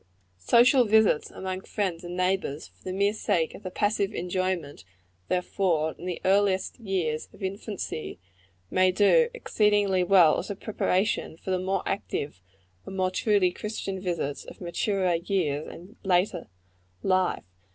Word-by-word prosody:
Social 240 - +5
visits 215 -7 +3
among 185 0 -5
friends 190 -5 -3
and 175 +1 -6
neighbors, 185 -5 0
for 90 0 -28
the 185 - -3
mere 200 +2 +1
sake 165 -6 0
of - - -10
the 185 - -5
passive 205 +1 0
enjoyment 180 - -2 0.4
they 180 - +2
afford 170 -4 0
in - - -8
the 180 - -3
earliest 195 +1 +2
years 180 -8 -2
of - - -12
infancy, 195 -4 -5 0.5
may 185 0 +4
do 340 - +4
exceedingly 205 - +2
well 180 -4 +5
as - - -6
a 200 - -3
preparation 195 -4 -1
for 190 - -5
the 185 - +1
more 190 +1 -1
active 145 - -3 0.4
and 195 - -8
more 185 -1 +1
truly 200 -2 +2
Christian 195 -1 -5
visits 170 -6 -3
of - - -12
maturer 185 +1 0
years 165 -5 -1
and 185 +7 -12
later 180 -2 +1 0.6
life. 185 -1 +1
185 Hz, 150 wpm, -27 LUFS, 175-200 Hz, 0.6 s, Social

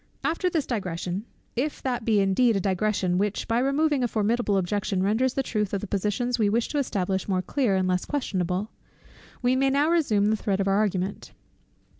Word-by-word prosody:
After 335 +3 0
this 320 -5 -1
digression, 185 -2 -3 0.3
if 285 +5 -1
that 245 -4 -2
be 220 -3 +3
indeed 210 +4 +3
a - - +2
digression 190 -1 0
which 205 0 -1
by 230 +1 +1
removing 275 +1 +1
a - - +2
formidable 215 -1 +1
objection 190 0 -1
renders 235 +6 +1
the 270 - +1
truth 210 -5 -1
of 195 - -2
the - - -4
positions 210 +5 -1
we 210 -2 +3
wish 230 +3 0
to 295 - -1
establish 190 -7 -1
more 185 -1 +1
clear 245 -6 +1
and 185 -1 +1
less 180 0 0
questionable, 190 -7 -2 0.7
we 250 +1 +3
may 270 +1 +3
now 285 +4 +2
resume 215 -11 +2
the - - +3
thread 200 -2 -1
of 195 - 0
our 195 - +3
argument. 195 -2 -1
210 Hz, 195 wpm, -26 LUFS, 195-250 Hz, 0.7 s, be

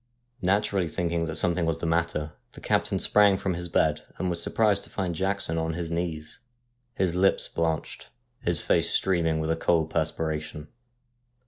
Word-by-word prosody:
Naturally 95 -1 +1
thinking 85 0 -1
that 80 -1 -4
something 90 -1 +2
was 80 0 0
the 80 - -5
matter, 80 -2 0 0.2
the - - -11
captain - - 0
sprang 100 -2 +4
from 95 -1 -1
his 85 0 -5
bed, 75 -2 +2 0.2
and 90 -1 -1
was 85 -1 -1
surprised 105 -3 +2
to - - -16
find 90 -4 -2
Jackson 95 -2 -1
on 80 0 -1
his 85 -1 -4
knees, 85 -2 -3 0.6
his 90 -3 +1
lips 95 +2 +2
blanched, 80 -1 -3 0.3
his - - -1
face - - +2
streaming 85 -4 +1
with 80 +1 -1
a - - +2
cold 80 -1 +1
perspiration. 75 -1 -2
85 Hz, 165 wpm, -27 LUFS, 80-95 Hz, 0.6 s, sprang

